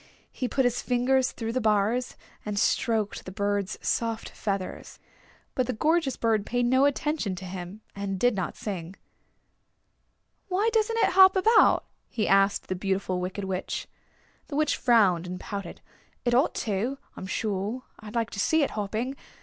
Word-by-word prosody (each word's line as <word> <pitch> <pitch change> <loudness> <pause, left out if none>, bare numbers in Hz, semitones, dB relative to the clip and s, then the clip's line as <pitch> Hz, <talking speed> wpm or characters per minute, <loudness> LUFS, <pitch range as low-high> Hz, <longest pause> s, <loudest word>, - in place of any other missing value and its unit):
He 255 - -3
put 265 +1 +1
his 245 -1 +1
fingers 255 +1 +2
through 225 -1 -4
the 255 - 0
bars, 215 +3 +1 0.3
and 210 -1 -4
stroked 215 0 +1
the 185 - -8
bird's 200 0 -1
soft 230 -1 -1
feathers. 195 -3 -4 0.6
But 255 -2 0
the - - -1
gorgeous 305 +3 +1
bird 225 -3 +1
paid 245 +3 0
no 260 +3 +4
attention 285 -7 0
to 185 +1 -8
him, 185 +3 -7
and 195 -1 -3
did 245 +3 +3
not 190 -4 -3
sing. 185 -3 -5 1.5
"Why 400 +4 +1
doesn't 450 0 +2
it - - +3
hop 380 0 +7
about?" 435 +4 +5 0.2
he 215 - -1
asked 195 +1 +3
the - - -2
Beautiful 190 -1 -1
Wicked 185 +3 -4
Witch. 190 -1 -3 0.6
The 285 - -6
Witch 300 0 +2
frowned 195 -8 +3
and 180 0 -5
pouted. 200 -4 -6 0.4
"It 240 - +2
ought 255 +3 +3
to, 225 +6 -1 0.2
I'm 190 - -7
sure. 210 +5 -2 0.2
I 215 - -9
like 230 +1 -2
to 200 - -6
see 315 +9 +3
it - - -1
hopping. 220 +6 -3
220 Hz, 165 wpm, -27 LUFS, 195-255 Hz, 1.5 s, hop